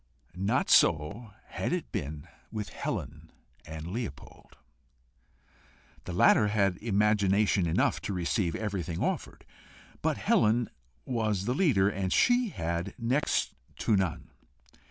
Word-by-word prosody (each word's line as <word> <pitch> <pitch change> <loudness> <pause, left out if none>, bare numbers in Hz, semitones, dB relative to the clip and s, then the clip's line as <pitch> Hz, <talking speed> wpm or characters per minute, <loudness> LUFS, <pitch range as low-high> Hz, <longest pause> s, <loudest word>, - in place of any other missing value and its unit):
Not 95 +3 0
so 90 +9 +3 0.2
had - - -3
it - - -3
been 75 +2 -5 0.2
with 105 -2 -4
Helen - - -5 0.4
and 80 0 -7
Leopold. 105 - -7 1.5
The 90 - -5
latter 105 +4 +5
had 100 -3 +1
imagination 105 -3 +2
enough 80 - +1
to - - -4
receive 90 0 -1
everything 95 -6 -3
offered, - - -3 0.6
but - - 0
Helen 115 +2 +2 0.3
was 110 -6 -1
the 125 - 0
leader, 130 - +3
and 95 -2 -2
she 245 -1 +3
had 85 - -3
next 125 +5 0 0.3
to 110 - +4
none. 95 -4 -2
100 Hz, 115 wpm, -29 LUFS, 90-110 Hz, 1.5 s, latter